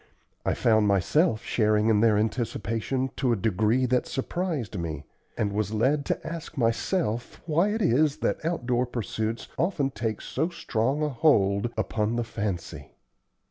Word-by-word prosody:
I - - 0
found 110 -2 +3
myself 110 - +2
sharing 105 -1 +2
in 110 -2 +4
their 110 -1 +4
anticipation 115 +3 -1
to 130 -3 +1
a - - +3
degree 110 +5 +1
that 125 0 +1
surprised 150 - -3
me, 80 -4 -4 0.3
and 100 -1 0
was 105 0 -1
led 140 +6 +2
to - - -2
ask 165 -1 -6
myself 120 - 0
why 170 +5 +2
it 215 +1 -1
is 145 +1 +3
that - - -1
outdoor 125 -7 0
pursuits 115 -1 -3
often 160 -6 +1
take 110 -1 -3
so 160 +6 -2
strong 135 -3 -1
a 150 - +1
hold 115 -7 +3
upon 110 0 0
the 120 - 0
fancy. 100 -5 -5
115 Hz, 150 wpm, -27 LUFS, 110-145 Hz, 0.3 s, in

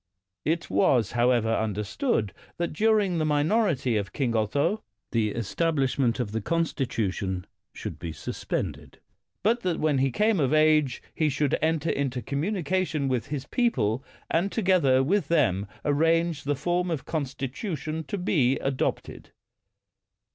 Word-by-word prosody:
It 165 +2 0
was, 105 +3 +2
however, 120 -1 +2
understood 105 - -1 0.2
that 170 -2 -2
during 205 -1 +2
the - - +1
minority 150 - +2
of 100 -2 -3
King 125 -5 0
Otho 145 - +1 0.3
the 115 -3 +1
establishment 135 - 0
of 115 -5 -2
the 110 +1 -2
constitution 105 - -1 0.3
should - - -7
be 85 -1 -5
sus 80 - -7
pended; - - -4 0.5
but 230 +4 +3
that 180 -5 -1
when 150 -3 +2
he 135 +1 +3
came 210 - +2
of 140 0 +2
age 155 -4 +3
he 155 -1 +1
should 145 0 +1
enter 160 0 +1
into 130 -3 -2
communication 165 - -1
with 125 -3 -1
his 140 -2 -4
people 130 - 0 0.3
and 175 +5 +1
together 175 - +3
with 195 +8 +1
them 105 - +2 0.2
arrange 165 +1 +2
the 145 0 +1
form 175 +5 0
of 160 -4 -3
consti 140 -4 -3
tution 160 - -4
to 205 - -3
be 140 -8 +2
adopted. 135 -1 -3
145 Hz, 140 wpm, -26 LUFS, 125-170 Hz, 0.5 s, but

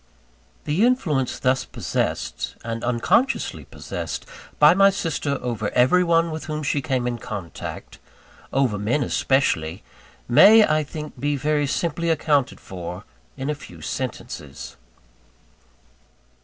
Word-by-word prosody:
The 155 +8 +1
influence 170 - +1
thus 130 0 +1
possessed, - - -3
and 115 0 -4
unconsciously 125 - +1
possessed, - - -6 0.3
by 150 +2 +7
my 195 +1 +6
sister 160 -7 -2
over 115 -4 -2
every 130 +9 +4
one 165 -1 +2
with 155 0 -5
whom 155 0 -4
she 145 0 0
came 130 -4 -1
in 120 -1 -2
contact 100 -6 -7 0.5
over 130 -7 +1
men 120 +8 +1
especially 95 - 0 0.4
may, 210 - +8
I 155 0 +1
think 150 +1 -8
be 145 +1 0
very 145 +1 0
simply 170 +4 -1
accounted 145 -4 +1
for, 90 0 -7 0.3
in 135 - -4
very 150 - 0
few 85 - -12
sentences. 70 -2 -6
140 Hz, 125 wpm, -23 LUFS, 120-155 Hz, 0.5 s, may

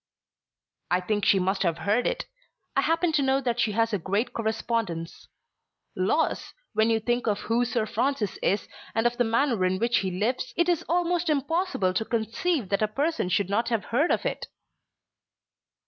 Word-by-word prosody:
"I 180 - +3
think 205 +2 -1
she 195 - +5
must 190 +1 0
have 170 -3 +1
heard 210 +8 +1
it. - - -2 0.5
I - - +4
happen 330 +1 +1
to 305 - +2
know 270 0 +2
that 245 -3 -1
she 220 -3 +1
has 230 +1 +1
a 205 - +1
great 200 +7 -1
correspondence. 220 -6 -2 0.7
Laws! - - 0 0.2
when 220 +1 +3
you 225 -1 +3
think 240 +2 -1
of 205 -2 0
who 235 +2 +1
Sir 235 -2 0
Francis 245 -2 -1
is 200 - 0 0.3
and 225 +1 +1
of 240 0 +1
the 245 - +3
manner 235 -2 +1
in 185 +1 +2
which 235 +3 +2
he 190 - -1
lives, 235 +7 -2
it 345 0 +3
is 350 -1 +1
almost 350 0 +1
impossible 300 - 0
to 205 - 0
conceive 230 - -1
that 200 - 0
a 215 - +3
person 280 - -1
should 195 +1 +1
not 230 +4 +1
have 230 -3 -1
heard 295 +8 +3
of - - 0
it." - - -3
230 Hz, 185 wpm, -26 LUFS, 205-270 Hz, 0.7 s, she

